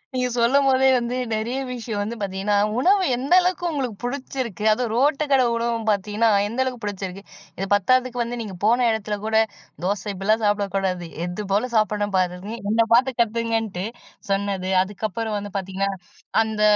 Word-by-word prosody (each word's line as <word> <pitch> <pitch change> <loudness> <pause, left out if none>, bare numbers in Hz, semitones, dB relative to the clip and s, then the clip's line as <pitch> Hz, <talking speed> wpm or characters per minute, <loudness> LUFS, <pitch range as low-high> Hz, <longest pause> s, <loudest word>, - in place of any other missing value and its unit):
நீங்க 250 0 +1
சொல்லம்போதே 265 +2 +4
வந்து 240 +1 -2 0.2
நெறைய 235 +5 -2
விஷயம் 230 -4 -4
வந்து 220 +3 -3
பார்த்தீங்கன்னா 195 +1 -1 0.2
உணவு 380 +6 +4
எந்த 270 +7 -1
அளவுக்கு 360 0 -1
உங்களுக்கு 260 -8 -2
புடிச்சிருக்கு. 250 -5 -4
அதுவும் 230 0 0
ரோட்டு 285 +4 +2
கடை 260 -2 +5
உணவு 230 0 0
பார்த்தீங்கன்னா, 210 +2 +1 0.2
எந்த 235 +4 -5
அளவுக்கு 250 -2 -4
புடிச்சிருக்கு? 195 -1 -5 0.3
இது 195 - -2
பத்தாததுக்கு 250 +4 +2
வந்து 240 +1 -4
நீங்க 200 -4 -6
போன 240 +2 +4
இடத்துல 215 -1 -2
கூட, 220 0 +2 0.5
"தோசை 200 +3 -1
இப்டிலாம் 215 +4 +1
சாப்பிடக்கூடாது. 195 -3 0 0.2
எது 180 +4 -5
போல 220 +6 +1
சாப்பிடணும் 210 -1 +1
பாருங்க. 180 +3 -1 0.2
என்ன 225 0 +3
பாத்து 260 +2 +4
கத்துக்கங்கன்ட்டு." 225 -4 -1 0.4
சொன்னது 195 -1 -1
அதுக்கப்புறம் 210 +3 -3
வந்து 205 -1 -6
பார்த்தீங்கன்னா, 195 +1 -2 0.5
அந்த 220 -1 -2
220 Hz, 150 wpm, -23 LUFS, 200-245 Hz, 0.5 s, கடை